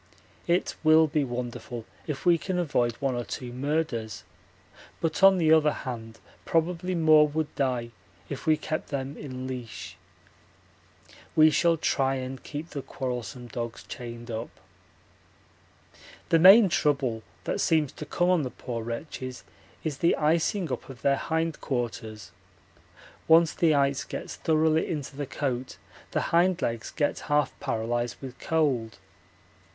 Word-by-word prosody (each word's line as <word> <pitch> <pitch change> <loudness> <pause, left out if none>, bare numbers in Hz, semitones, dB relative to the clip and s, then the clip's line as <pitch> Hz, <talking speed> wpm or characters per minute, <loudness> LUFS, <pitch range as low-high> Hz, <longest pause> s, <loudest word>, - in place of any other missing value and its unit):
It 175 +1 +1
will 160 0 +6
be 150 -1 0
wonderful 120 -2 -5 0.2
if 150 +1 -4
we 170 -2 +5
can 185 +1 -2
avoid 130 -9 +1
one 135 +2 -2
or 120 0 -2
two 120 0 -6
murders, 130 -6 -2 0.8
but 160 -1 -1
on 195 0 +8
the 160 -2 +4
other 155 -1 +5
hand 115 -5 -6 0.3
probably 175 +2 0
more 155 -2 +6
would 155 +1 -3
die 125 -4 -1 0.4
if 140 +3 -7
we 155 -1 +5
kept 155 +1 -4
them 140 0 -3
in 130 -3 -7
leash. 125 -4 -7 1.4
We 155 0 +7
shall 170 +1 +3
try 135 -3 +1
and 130 0 -5
keep 155 +3 -7
the 140 - -4
quarrelsome 125 -2 -5
dogs 115 0 -5
chained 120 -1 -8
up. 115 +1 -4 1.8
The 165 - +5
main 195 +5 +9
trouble 140 -9 +1 0.2
that - - -2
seems 155 -4 +2
to 150 - -8
come 175 +1 +2
on 180 -3 +3
the 130 - -3
poor 115 -1 -6
wretches 125 +2 -6 0.4
is 150 -4 -3
the 170 - +3
icing 165 +2 +1
up 125 - -4
of 130 -2 -11
their 140 0 +4
hindquarters; 120 - -3 1.0
once 165 0 +6
the 160 -3 +3
ice 140 -1 +2
gets - - -6
thoroughly 160 0 +2
into 145 -3 -4
the 145 -1 -4
coat 130 -2 -3 0.3
the - - 0
hind 180 +1 +4
legs 115 -1 -2
get 145 -2 -1
half 145 0 +2
paralysed 120 -2 -2
with 130 -2 -9
cold. 135 -9 0
140 Hz, 145 wpm, -27 LUFS, 120-160 Hz, 1.8 s, main